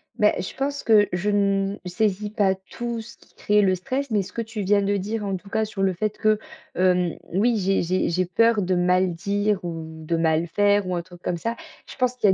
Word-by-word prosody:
Beh, - - +4
je - - -7
pense 280 +1 -2
que 210 -3 +5
je 185 +4 0
ne 200 -1 +1
saisis 205 +2 -1
pas 195 -3 +2 0.2
tout 235 -1 -4
ce 220 - -13
qui - - -25
crée 210 0 +2
le 190 -2 +3
stress. 260 +9 -3
Mais, 205 -3 +1
ce - - -12
que 230 - -2
tu 225 -2 -5
viens 200 +1 +3
de 200 0 +1
dire, 210 +3 -3
en 195 -1 -1
tout 200 +2 -15
cas, 220 0 0
sur 200 -2 -3
le 190 -1 +2
fait 215 +4 -2
que, 215 0 +2 0.4
hem, 180 -2 +2 0.2
oui, 225 +4 +2
j'ai 195 -1 +1
j'ai 185 +2 0
j'ai 180 +2 +1
peur 225 +4 +3
de 185 +1 0
mal 180 0 +2
dire 200 +2 -1
ou 165 -2 -4 0.2
de 170 - +1
mal 165 0 +1
faire 205 +2 +2
ou 180 - -1
un 170 - -2
truc 175 0 -15
comme 175 - -2
ça. 230 +6 -3 0.3
Je - - -10
pense 250 0 +1
qu'il 225 -4 +2
y 190 - +6
200 Hz, 245 wpm, -24 LUFS, 180-215 Hz, 0.4 s, y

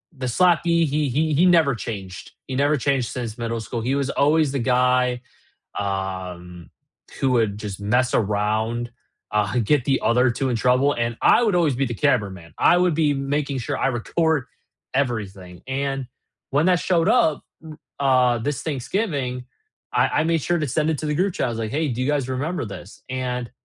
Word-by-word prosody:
the 130 -2 -4
slappee, 170 +3 +3
he 150 -1 0
he 155 +5 0
he 160 +6 +4
never 165 -6 +4
changed, 100 -5 -7 0.2
he 130 - -4
never 145 +3 +2
changed 135 -2 0
since 115 -4 -5
middle 115 0 -3
school, 115 +2 -5
he 130 +4 0
was 140 -1 -1
always 150 +1 +2
the 140 - -2
guy, 125 0 +2 0.6
um, 95 -3 -5 0.5
who 135 -1 +2
would 110 -4 +1
just 105 -2 -6
mess 120 +5 +1
around, 110 +3 0 0.4
uh, 105 +2 0
get 125 +3 +2
the 135 0 +1
other 125 +2 +3
2 135 +3 -2
in 120 - 0
trouble, 125 +5 +3
and 115 0 -2
I - - +5
would 215 -5 +2
always 160 -7 +2
be 135 +1 0
the 120 - -4
cameraman. 100 - -1
I - - +5
would 180 -2 +2
be 150 -2 +2
making 140 0 -2
sure 120 - -3
I - - +1
record 145 +4 0 0.5
everything, 100 -9 -3
and 135 0 -2 0.4
when 145 +4 +2
that 180 -2 +3
showed 170 -3 +1
up, 195 -12 +2 0.6
r 130 -3 +3
uh, - - -1
this 140 +4 -3
Thanksgiving, 140 - -2 0.5
I - - +3
I - - +1
made 165 0 +1
sure 175 +4 0
to 150 - -1
send 155 +4 0
it 160 - 0
to - - -4
the 150 - -1
group 185 +4 +1
chat, - - -1
I - - -2
was 115 - -4
like, 110 -1 -3
"Hey, 155 +1 0
do 125 0 -3
you 130 - 0
guys 145 -3 0
remember 145 +5 -2
this?" 100 -1 -10
And 125 -2 -3
130 Hz, 195 wpm, -22 LUFS, 115-150 Hz, 0.6 s, I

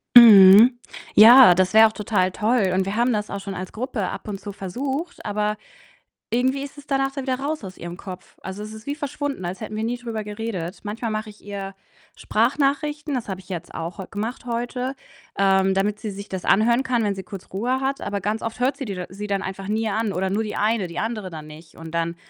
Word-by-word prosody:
Mhm. 225 +1 +9 0.4
Ja, 235 -2 +10
das 185 0 +1
wäre 220 +1 +8
auch 220 - -7
total 200 -3 0
toll, 215 -2 +1
und 190 0 +1
wir 195 - -3
haben 240 +2 +2
das 210 -1 -2
auch 200 - -4
schon 195 0 -6
als 185 0 -6
Gruppe 225 -4 -3
ab - - -7
und 200 -2 -5
zu 205 - -7
versucht, 265 - -5
aber 210 0 -1 0.7
irgendwie 260 +3 +1
ist 285 - -10
es 285 - -12
danach 270 -1 0
dann 275 -1 -5
wieder 255 -1 -1
raus 295 +2 -3
aus 185 -1 -9
ihrem 175 +1 -7
Kopf. 185 -2 -10
Also, 190 +2 -6
es 215 +1 -8
ist 220 +1 -11
wie 285 - -2
verschwunden, 285 - -4
als 180 +4 -5
hätten 215 0 -6
wir 220 - -2
nie 240 +2 -2
drüber 230 -3 -5
geredet. 210 -4 -5
Manchmal 220 +2 -4
mache 215 0 -4
ich 210 - -18
ihr 195 -1 -6 0.4
Sprachnachrichten, 285 +5 0
das 245 -4 -3
habe 190 -1 -4
ich 185 - -19
jetzt 175 -3 -6
auch 165 +4 -5
heu 190 - -6
gemacht 220 +6 -4
heute, 245 +2 -3 0.4
ähm, 190 -1 +3
damit 205 +2 0
sie 220 - -4
sich 200 +1 -8
das 190 -1 -5
anhören 235 +5 +3
kann, 245 -4 0
wenn 205 -1 0
sie 190 - -6
kurz 190 0 -10
Ruhe 245 +7 -1
hat. 270 +1 -1
Aber 200 0 -3
ganz 210 +3 -2
oft 225 0 -4
hört 260 +2 +1
sie 280 - -5
die 205 -5 -4
da 180 -1 -5
sie 200 +3 -6
dann 200 -1 -1
einfach 190 0 -6
nie 220 +1 0
an, 215 0 -1
oder 190 +1 -1
nur 205 +3 0
die 215 - -5
eine, 210 -3 +1
die 170 +1 -7
andere 215 -2 -3
dann 155 -2 -8
nicht 155 +1 -14
und 165 0 -10
dann 170 0 -1
210 Hz, 235 wpm, -23 LUFS, 190-245 Hz, 0.7 s, Ja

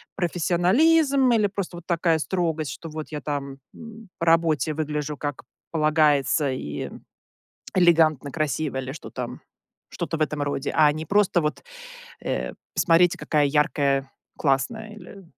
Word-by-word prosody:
профессионализм 250 - +3
или 215 -3 +3
просто 195 -3 -5
вот 170 - -11
такая 165 -2 +2
строгость, 160 -1 -1
что 165 - -8
вот 155 0 -6
я 150 - -4
там, 140 -1 -4 0.2
м, 225 -2 -12
по 170 - -1
работе 165 -2 +3
выгляжу 150 -1 -3
как 145 -2 -4 0.3
полагается 150 -2 +2
и 75 - -5 0.8
элегантно, 160 -5 +4
красиво 150 -1 -2
или 130 0 -4
что 155 - -10
там, - - -6 0.5
что-то - - -3
в - - -13
этом 150 0 -2
роде, 145 -1 -2
а 150 -1 +6
не 155 +1 -5
просто 200 -3 +3
вот 150 -1 -2 0.6
э: - - -2 0.2
"Посмотрите 175 0 +4
какая 150 -2 +1
яркая, 140 -2 +1 0.3
классная 185 - -1
или" 195 -1 -12
155 Hz, 140 wpm, -24 LUFS, 145-180 Hz, 0.8 s, а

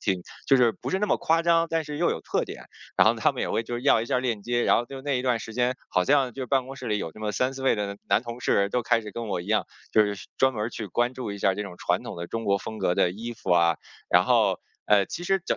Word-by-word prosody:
挺 95 -2 -1 0.2
就 135 - +6
是 120 -2 +5
不 - - -5
是 190 - +1
那 210 - 0
么 - - +2
夸 165 +1 +2
张， 165 0 +3
但 165 0 +1
是 150 0 -6
又 170 - +2
有 - - -3
特 - - -1
点， - - -9 0.3
然 - - +5
后 - - +3
他 - - +2
们 - - -5
也 - - -2
会 115 - 0
就 120 - -5
是 120 - -4
要 130 -4 +4
一 115 - -4
下 125 - +1
链 120 -5 -2
接。 120 +2 0
然 - - +4
后 120 - 0
就 135 +1 -8
那 140 -2 0
一 - - -3
段 125 -2 +1
时 110 - -8
间， 125 +1 +1
好 90 - +1
像 135 -1 +3
就 130 +1 -5
办 135 0 +1
公 135 +1 -8
室 130 - -7
里 105 -2 0
有 80 - -4
这 - - -14
么 105 -1 -2
3-4 130 +3 -1
位 135 - +3
的 100 -1 -3
男 110 - +3
同 120 0 -7
事 100 -4 +2
都 125 +4 -1
开 115 0 +2
始 105 -1 -8
跟 115 +2 -5
我 95 -3 -1
一 85 - -9
样， 110 +1 +2 0.3
就 110 - +6
是 100 -3 -5
专 130 0 +4
门 110 0 -2
去 115 -2 -5
关 120 +6 0
注 120 -6 -5
一 100 - -7
下 95 -1 +2
这 105 - -3
种 100 -3 -8
传 - - 0
统 - - -7
的 85 0 -5
中 115 0 -4
国 100 0 +2
风 110 +2 -7
格 90 - +1
的 90 - +3
衣 115 +6 -6
服 110 -5 -6
啊。 85 -1 +4 0.3
然 - - +5
后， - - +3 0.3
呃， 105 -2 +5
其 175 - -6
实 195 +2 +2
整 - - 0
120 Hz, 330 characters per minute, -26 LUFS, 105-130 Hz, 0.3 s, 就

